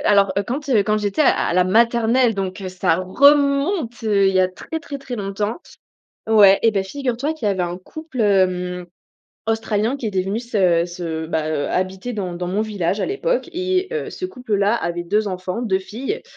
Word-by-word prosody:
alors, 200 -2 +4
heu, 200 - +1
quand, 275 +7 -5
heu, 225 -6 +4
quand 215 +1 +1
j'étais 205 +5 -2
à - - +5
à - - 0
la 180 - +4
maternelle, 230 +3 +3
donc 195 0 -4
heu, 190 - -5
ça 180 -3 +1
remonte, 280 - +2
heu, 200 -2 +3
il 190 - -1
y 185 - +4
a 185 - +3
très, 320 +12 -7
très, 285 -4 -7
très 265 -2 -6
longtemps. 205 - -3 0.7
Ouais, 200 -3 +7
et 225 - +4
ben, 195 -2 0
figure 250 +3 -3
toi 290 +5 -1
qu'il 305 -10 -3
y - - +3
avait 190 -2 -1
un 175 0 -4
couple, 310 - -7
hem, 180 -3 +1 0.6
Australien 225 +2 0
qui 250 -5 -5
était 190 -3 0
venu 195 +3 -2
se 190 -8 +2
se 165 -2 -5
bah, 155 -1 -2
heu, 150 -2 -1
habiter 185 +6 -2
dans 190 -5 -4
dans 175 +1 -4
mon 200 +3 0
village 205 -2 -2
à - - 0
l'époque - - -1
et 370 +1 0
heu, 460 - -3
ce 370 - -7
couple 250 - -4
là 200 +3 +2
avait 175 -6 -2
2 210 +5 0
enfants, 185 +3 -4
2 190 -5 +1
filles 250 - -5
210 Hz, 215 wpm, -20 LUFS, 185-250 Hz, 0.7 s, Ouais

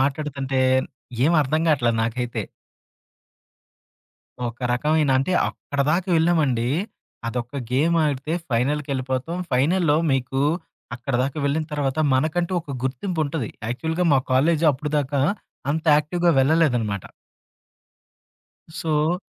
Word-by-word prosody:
మాట్లాడుతుంటే 140 -1 -1 0.6
ఏమర్థం 155 -1 +2
గాట్లా 125 -6 +3
నాకైతే. 120 +1 -2 2.1
ఒక 115 0 -9
రకమైన 150 +3 +2
అంటే 135 +8 0 0.2
అక్కడి 140 -1 -3
దాకా 175 +3 0
వెళ్ళామండి. 155 -8 +2 0.6
అదొక 125 +3 -4
గేమ్ 160 +6 +3
ఆడితే 145 +1 -2 0.2
ఫైనల్‌కి 135 +5 0
వెళ్ళిపోతాం. 130 +5 -2
ఫైనల్‌లో 150 +4 +3 1.0
అక్కడిదాకా 130 +2 -2
వెళ్ళిన 145 +3 0
తర్వాత 145 -1 -1
మనకంటూ 160 +6 +1
ఒక 155 - -11
గుర్తింపుంటది. 155 - -2 0.2
యాక్చువల్‌గా 160 +9 -1
మా 135 - +5
కాలేజు 155 +5 +3
అప్పటిదాకా 145 0 -1 0.5
అంత 160 +2 -1
యాక్టివ్‌గా 170 +4 +1
వెళ్ళలేదనమాట. 130 - +2 1.7
సో 160 +2 +1
145 Hz, 95 wpm, -23 LUFS, 130-160 Hz, 2.1 s, మా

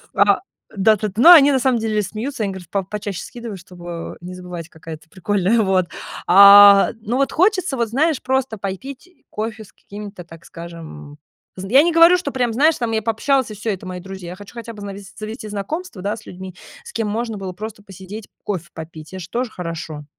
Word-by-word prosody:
А, - - +4 0.4
да 215 +2 +4
т 215 - -2
т - - -15
Но 345 - +10
они 290 -4 +9
на 265 - +2
самом 250 -2 +2
деле 215 -1 0
смеются, 220 +4 -4
они 200 - -1
говорят 180 -3 -10
по 195 0 -1
почаще 205 -1 -5
скидываю, 235 -4 -8
чтобы 175 -2 -8
не 180 +1 -8
забывать, 180 -2 -8
какая 160 0 -9
ты 160 +1 -25
прикольная, 205 +3 +1
вот. 190 -3 +2 0.4
А, 200 +1 +9
но 235 +4 -2
вот 275 0 +1
хочется 370 - +1
вот, 235 -2 0
знаешь, 300 +4 +1
просто 265 -3 -1
пой 195 -1 -3
пить 275 - -10 0.2
кофе 220 0 -4
с 205 - -19
какими 205 0 -9
то 180 -4 -10
так 165 -1 -15
скажем 160 -3 -10 0.4
з 190 +1 -7
я 265 +6 +7
не 345 - +2
говорю, 335 +2 +7
что 290 -5 -4
прям, 245 -3 -1
знаешь, 300 +7 +4
я 225 -2 -1
пообщалась 230 +4 +1
и 215 - -7
всё, 215 +2 -3
это- 190 - -6
мои 180 0 -5
друзья. 190 -1 -9
Я - - -7
хочу 205 +1 -13
хотя 235 -1 -8
бы 205 - -11
знавес 200 0 -8
завести 215 +1 -7
знакомств, 235 - -5
да, 205 +4 -2
с 215 - -13
людьми, 185 0 -9 0.3
с 470 - -12
кем 225 - -1
можно 225 +1 -3
было 190 -1 -6
просто 215 +2 -8
посидеть 195 +2 -10 0.2
кофе 180 -4 -4
попить. 160 0 -10
Это 190 - -6
же 170 -1 -9
тоже 240 +3 -2
хорошо. 165 -4 -6
205 Hz, 215 wpm, -20 LUFS, 185-235 Hz, 0.4 s, Но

